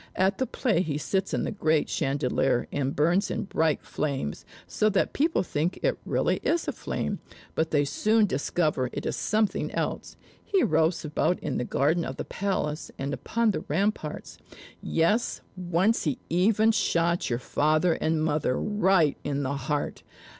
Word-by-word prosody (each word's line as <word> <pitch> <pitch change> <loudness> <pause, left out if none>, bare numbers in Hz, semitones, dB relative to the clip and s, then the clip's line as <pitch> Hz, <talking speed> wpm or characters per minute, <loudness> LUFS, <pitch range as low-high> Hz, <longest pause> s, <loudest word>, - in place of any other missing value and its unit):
At 190 +1 +1
the 260 - 0
play, 225 -6 +1
he 150 -5 -2
sits 190 +5 -1
in - - 0
the - - -2
great 160 -7 +1
chandelier 135 -2 0
and 140 -1 -1
burns 170 +7 +2
in - - -2
bright 160 -5 0
flames, 135 - -3 0.2
so 215 - +1
that 200 - +1
people 320 - +2
think 170 +1 -1
it - - +4
is - - 0
really - - +1
a 340 - +3
flame, 335 - -3 0.3
but 160 0 0
they 145 -2 +2
soon 215 +9 +3
discover 145 -4 0
it - - -4
is - - -1
something 215 -1 0
else. - - -3 0.3
He 390 -3 +2
roves 160 +2 +2
about 155 +4 +1
in - - -2
the 125 - -1
garden 160 +8 +1
of - - -4
the - - -4
palace 175 -6 -2
and 140 +1 -3
upon 230 +8 0
the - - -3
ramparts: 180 -1 -2 0.4
yes, 170 +9 +1
once 180 +5 +1
he 145 -4 0
even 215 +5 +4
shot 170 -5 +1
your 120 - 0
father 155 +6 +2
and 160 -1 0
mother 150 -4 0
right 190 -7 +2
in 145 -1 -1
the 135 +1 -1
heart. 140 +2 -2
165 Hz, 170 wpm, -27 LUFS, 145-200 Hz, 0.4 s, it